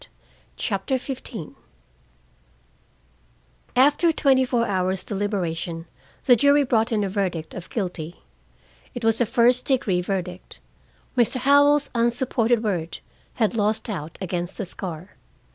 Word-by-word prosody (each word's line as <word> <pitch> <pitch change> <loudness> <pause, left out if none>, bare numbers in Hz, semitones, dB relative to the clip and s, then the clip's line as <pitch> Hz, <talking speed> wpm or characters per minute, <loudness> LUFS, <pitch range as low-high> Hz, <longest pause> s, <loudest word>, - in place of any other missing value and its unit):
CHAPTER 205 +5 -1
XV 250 - -7 2.2
After 290 +6 +4
twenty 270 -4 +3
four 240 -2 +1
hours' 190 -2 -1
deliberation, 175 -5 -3 0.4
the 250 - +7
jury 285 +4 +4
brought 230 -3 +1
in 215 -2 +1
a - - 0
verdict 185 -5 -2
of 180 - -8
guilty. 175 -6 -5 0.7
It 240 -2 -4
was 225 +1 +2
a 240 - +2
first 245 +1 +4
degree 210 -9 +1
verdict. 180 -1 -5 0.6
Mr. 240 -1 +2
Howell's 285 +2 +4
unsupported 235 -1 +1
word 175 -6 -2 0.4
had 220 -2 +1
lost 215 +1 0
out 165 -5 -6
against 175 0 -4
a 205 - -2
scar. 175 -1 -7
215 Hz, 120 wpm, -23 LUFS, 185-250 Hz, 2.2 s, the